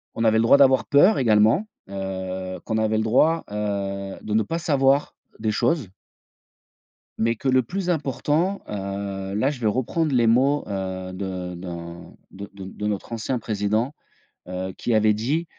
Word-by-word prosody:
On 115 - -1
avait 110 0 +4
le 115 - +3
droit 115 - +6
d'avoir 130 -3 +5
peur 180 +8 +5
également, 110 - +4 0.2
heu, 95 -1 -4
qu'on 110 - -2
avait 110 0 +1
le 110 - +1
droit, 150 +9 +3
heu, 100 -2 -3
de 105 - -4
ne 110 0 +3
pas 165 +10 -3
savoir 140 -4 +2 0.3
des 110 0 0
choses 130 - 0 1.3
mais 115 +1 +1
que 130 - -5
le 130 0 +4
plus 180 - -3
important, 160 +4 0
heu, 100 -1 -4
là, 130 +6 +2
je 135 - -8
vais 110 - +2
reprendre 135 +7 0
les 120 -2 +3
mots, 135 +5 +3
heu, 95 -2 -4
de 90 -1 -5
d'un 85 -1 -8 0.2
de 100 +1 -9
de 100 -1 -9
de 105 +2 -5
notre 105 +3 -3
ancien 115 +3 -2
président, 110 +5 -1 0.5
heu, 90 +1 -4
qui 120 - -1
avait 110 0 +4
dit, 140 +11 -1
110 Hz, 170 wpm, -23 LUFS, 100-135 Hz, 1.3 s, droit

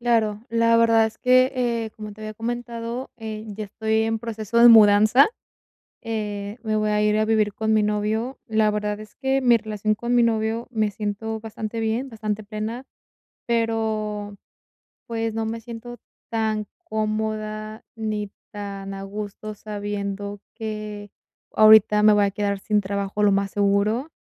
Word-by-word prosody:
Claro, 225 -2 +1
la 230 0 +4
verdad 230 -1 +5
es 220 - -7
que, 255 +1 +4
eh, 235 -3 -1
como 215 -1 -7
te 215 - -15
había 215 0 -6
comentado, 235 +2 -4
eh, 220 -1 -6
ya 210 +1 -5
estoy 220 +2 0
en 225 0 0
proceso 225 0 -2
de 240 0 +9
mudanza, 215 +4 +7 0.8
eh, 210 -1 -4
me 215 -1 -1
voy 215 0 +1
a 210 - +2
ir 210 0 +3
a 215 - +2
vivir 215 -2 +1
con 220 0 0
mi 215 -1 +4
novio, 215 +5 -1
la 220 -2 +2
verdad 210 0 -2
es 215 -1 -12
que 270 0 0
mi 240 -2 +5
relación 215 -1 -1
con 235 +3 -2
mi 240 - +5
novio 225 0 0
me 215 -3 0
siento 215 +2 -4
bastante 220 0 -5
bien, 225 +4 -1
bastante 215 -2 -4
plena, 215 +4 -5 0.6
pero, 220 -3 -1 0.7
pues, 225 -1 -2
no 225 0 -2
me 225 0 -4
siento 240 +1 -8 0.3
tan 220 -2 -1 0.2
cómoda 215 0 -3
ni 215 -2 -3 0.2
tan 200 -1 -6
a 195 0 -6
gusto 210 +1 -6
sabiendo 205 -1 -5
que 215 -2 -6 0.4
ahorita 215 -1 +7
me 215 0 +7
voy 205 -1 +4
a 200 - +1
quedar 200 0 -1
sin 210 +1 0
trabajo 200 +1 -2
lo 205 -1 +5
más 195 0 +1
seguro, 205 +8 +1
215 Hz, 160 wpm, -23 LUFS, 210-225 Hz, 0.8 s, de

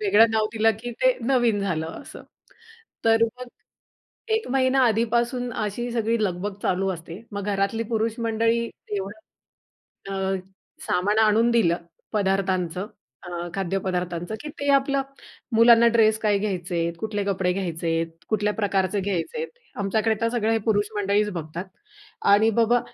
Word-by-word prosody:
वेगळं 210 +2 +5
नाव 220 -1 +2
दिलं, 225 0 +3
की 240 +1 -5
ते 255 -1 +4
नवीन 235 -4 +2
झालं 165 -5 -1 0.2
असं. - - -11 0.8
तर 225 0 +4 0.2
मग 250 -1 -7 0.9
1 445 - -1
महिना 265 0 +3
आधीपासून 235 +2 0
अशी 220 +4 -3
सगळी 230 0 +1
लगबग 190 +2 -2
चालू 190 +1 +1
असते, 170 +3 -9
मग 200 -1 -4
घरातली 200 +3 0
पुरुष 225 +1 0
मंडळी 230 +1 +1 0.3
एवढं 200 +3 -5 0.9
अ, 190 0 0 0.5
सामान 205 +4 +1
आणून 220 +2 +4
दिलं 185 -8 +3 0.4
पदार्थांचं, 190 -3 0 0.7
खाद्य 195 -1 -1
पदार्थांचं, 180 +1 -2
की 300 - -6
ते 285 - -2
आपलं 275 0 +2 0.5
मुलांना 235 0 +7
ड्रेस 220 -1 +4
काय 210 -2 +2
घ्यायचेत, 175 -4 -2
कुठले 210 -1 -2
कपडे 190 -2 0
घ्यायचे 175 -3 -3
आहेत, 165 0 0 0.2
कुठल्या 210 -1 +1
प्रकारचे 195 -1 0
घ्यायचेत. 205 - -2 0.3
आमच्याकडे 220 +3 +1
तर 230 - +2
सगळं 225 -2 +1
हे 225 - +2
पुरुष 205 -1 +2
मंडळीच 205 +1 +1
बघतात 165 +1 -5 0.7
आणि 220 +2 +5
बाबा 240 +2 +4
210 Hz, 140 wpm, -24 LUFS, 190-230 Hz, 0.9 s, मुलांना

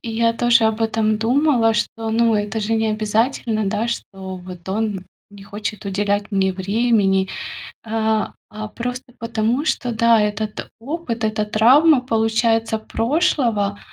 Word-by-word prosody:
И 230 - -6
я 230 0 +3
тоже 235 0 +3
об 220 0 +1
этом 220 -1 +1
думала, 240 -1 +2
что, 225 +1 -2
ну, 230 0 +3
это 205 +1 -1
же 215 +2 -2
необязательно, 220 +1 0
да, 220 +3 -1
что 190 -5 -5
вот 180 -1 -11
он 205 -2 -2 0.3
не 205 -1 -13
хочет 205 0 -6
уделять 205 +1 -1
мне 190 -2 +1
времени. 195 -1 +1 0.6
А 220 -1 -1 0.2
а 215 0 -6
просто 245 +2 -6
потому, 230 +5 -1
что, 245 -5 -1
да, 230 -1 +4
этот 210 0 -3
опыт, 255 -3 -4
эта 215 0 0
травма, 255 +8 +5
получается, 225 -1 +1
прошлого, 225 - 0
220 Hz, 140 wpm, -20 LUFS, 210-235 Hz, 0.6 s, травма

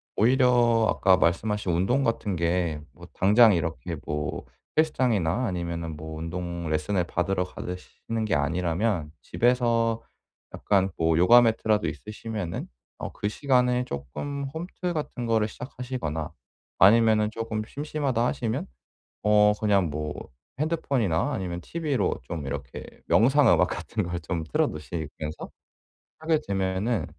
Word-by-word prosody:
오히려 120 -2 +4
아까 95 -1 +4
말씀하신 95 +3 +1
운동 120 +11 +2
같은 115 -5 -1
게 85 -2 0
뭐 85 +1 -13
당장 105 +3 +6
이렇게 80 -6 -3
뭐 75 0 -3 0.3
헬스장이나 125 - +2
아니면은 85 -4 -3
뭐 80 +1 -7
운동 85 +1 -4
레슨을 80 +5 0
받으러 90 +2 0
가시는 90 +5 -5
게 95 -8 +1
아니라면 85 +2 0
집에서 115 -2 +1 0.5
약간 95 -2 +1
뭐 80 -1 +2
요가 120 +8 +7
매트라도 110 -2 +2
있으시면은 105 -4 -5 0.3
어 - - -5
그 105 - -3
시간에 125 +1 +2
쪼끔 135 - -5
홈트 175 +2 -4
같은 145 -6 -4
거를 110 -2 +2
시작하시거나 125 - -5 0.5
아니면은 110 +1 +5
쪼금 110 -1 -3
심심하다 140 -4 -1
하시면 115 0 -2 0.6
어 105 0 +5
그냥 100 -4 +2
뭐 75 0 -3 0.5
핸드폰이나 135 - 0
아니면 90 -2 -3
티브이로 155 - -1
좀 75 +2 -6
이렇게 70 -2 -6 0.2
명상 130 +2 +5
음악 90 +1 +4
같은 110 +3 -3
걸 85 -1 -3
좀 85 -3 -3
틀어 75 - +1
놓으시면서 75 -1 -6 0.7
하게 160 0 +1
되면은 95 +3 0
105 Hz, 300 characters per minute, -26 LUFS, 85-120 Hz, 0.7 s, 요가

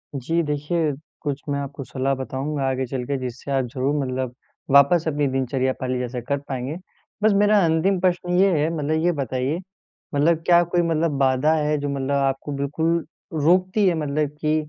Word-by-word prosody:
जी 165 +6 0
देखिए, 150 +2 0 0.3
कुछ 145 -2 -3
मैं 140 0 0
आपको 140 0 -6
सलाह 135 +1 -1
बताऊँगा 135 +2 -3
आगे 130 0 -1
चल 125 0 -4
के 140 +2 -1
जिससे 130 +1 -6
आप 135 -2 +1
ज़रूर 135 +1 0
मतलब 130 -1 -3 0.4
वापस 140 +4 +6
अपनी 145 -2 +1
दिनचर्या 130 0 0
पहले 130 -1 -1
जैसा 125 0 -3
कर 140 - +2
पाएँगे। 130 +2 -3 0.5
बस 215 - +5
मेरा 205 +1 +4
अंतिम 165 +4 +2
प्रश्न 180 -1 +1
ये 195 +1 +5
है 155 +2 +1
मतलब 155 +2 0
ये 175 - +3
बताइए 130 +4 -1 0.6
मतलब 160 +3 +2
क्या 175 -1 +6
कोई 175 - +4
मतलब 165 -3 0
बाधा 135 +3 +3
है 150 -1 +1
जो 145 0 -3
मतलब 140 0 -2
आपको 135 +1 0
बिल्कुल 160 +4 0 0.4
रोकती 185 +6 +3
है 175 - +3
मतलब 150 0 -1
की 155 0 +2
145 Hz, 180 wpm, -23 LUFS, 135-165 Hz, 0.6 s, वापस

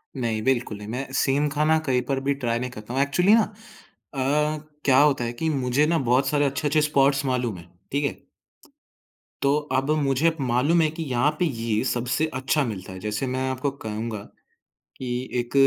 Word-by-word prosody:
नहीं, 115 -4 -1
बिल्कुल 120 -4 0
नहीं, 105 0 -9
मैं 125 +5 -3
सेम 140 +2 +2
खाना 155 +2 +2
कहीं 125 -1 +2
पर 135 -1 +1
भी 140 - +3
ट्राई 115 -1 +1
नहीं 125 +1 -3
करता 110 0 -8
हूँ, 135 - +1
एक्चुअली 180 +8 +3
ना 220 -1 +3 0.6
अ, - - -8 0.7
क्या 130 -2 +5
होता 140 -4 +4
है 120 0 -3
कि 160 +7 -2
मुझे 135 0 +1
ना 165 +1 +2
बहुत 130 +2 +3
सारे 145 +1 +2
अच्छे-अच्छे 145 +2 +1
स्पॉट्स 140 -2 +2
मालूम 125 -6 -1
हैं। 85 0 -13 0.2
ठीक 140 +1 0
है? - - -1 1.3
तो 140 +1 +3 0.2
अब 135 +2 -1
मुझे 140 +4 +2
मालूम 135 +7 +2
है 155 - +3
कि 160 +1 -5
यहाँ 125 +4 +2
पे 180 - +3
ये 115 -7 -1
सबसे 125 +4 0
अच्छा 135 +3 +1
मिलता 95 -5 -6
है, 95 - -8
जैसे 105 +6 -2
मैं 130 +1 -1
आपको 130 +2 -1
कहूँगा, 110 -4 -5 0.8
कि 125 0 -4
1 120 0 -4
130 Hz, 190 wpm, -24 LUFS, 120-145 Hz, 1.3 s, क्या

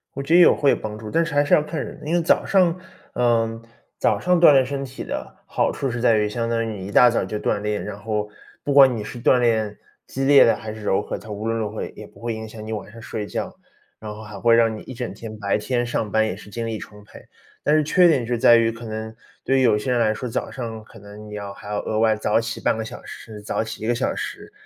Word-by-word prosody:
我 140 - -3
觉 155 +4 -1
得 175 - +8
也 - - +9
会 140 - +3
有 - - +3
帮 105 0 -6
助， 110 -1 -8
但 165 +6 +1
是 165 - -5
还 145 0 +4
是 - - +1
要 150 - +5
看 155 0 -4
人。 - - -10
因 160 - -2
为 175 - +3
早 165 - +2
上 180 -3 +3 0.4
呃， 115 -2 +1 0.4
早 - - +1
上 180 -1 +2
锻 155 - +9
炼 135 -2 +5
身 140 +1 -4
体 130 0 -7
的 - - -6
好 - - 0
处 135 - -3
是 120 0 -4
在 115 -3 +4
于 105 0 +1
相 115 +2 -3
当 115 -1 0
于 110 -2 -5
你 95 - -6
一 - - -7
大 125 +2 +7
早 115 - 0
就 105 +3 -4
锻 105 - 0
炼， 105 0 -2
然 105 -1 -6
后 105 0 -3 0.3
不 140 - -1
管 135 -3 +7
你 105 - -4
是 120 - -8
锻 125 +1 +4
炼 110 -3 +1 0.3
激 135 +1 -3
烈 140 0 +8
的， 115 - +4
还 110 0 -7
是 110 - -10
柔 100 -1 +1
和， - - -5
它 110 - -13
无 105 +2 -5
论 115 0 0
如 110 -2 -2
何 110 - -5
也 - - -5
也 - - -11
不 - - -20
会 115 -1 -3
影 110 0 -6
响 110 0 -10
你 110 - -4
晚 105 0 -6
上 115 0 -12
睡 110 -1 -5
觉。 - - -5 0.4
然 105 -1 -7
后 110 +1 -10
还 105 -2 -9
会 115 +1 +4
让 115 -1 +3
你 105 - -8
一 130 - -10
整 125 -1 -5
天， 110 -2 -9
白 100 0 0
天 120 +2 -1
上 110 -3 -2
班 110 0 +3
也 110 - -3
是 105 - -13
精 115 +2 -4
力 110 -2 -3
充 105 -1 -12
沛， 105 - -15 0.4
但 150 - +3
是 155 - +3
缺 175 +4 +5
点 140 -7 +2
是 120 +1 -1
在 120 0 +6
于 115 0 +3
可 115 +1 -11
能 110 0 -6 0.3
对 135 0 +2
有 110 -4 +4
些 125 +4 -2
人 120 - +2
来 110 -2 +3
说， 125 +3 -4
早 115 - -3
上 115 -4 -6
可 115 - -16
能 105 +1 -12
你 105 - -7
要 100 -1 -6
还 100 - -13
要 105 0 -2
额 110 0 -1
外 110 -1 +3
早 110 +1 +1
起 115 0 -5
半 - - +1
个 110 - -3
小 110 - -8
时， 110 -2 -10
早 110 - -1
起 110 0 -8
1 - - -2
个 120 - +2
小 120 - -1
时， - - -6
115 Hz, 310 characters per minute, -22 LUFS, 105-125 Hz, 0.4 s, 也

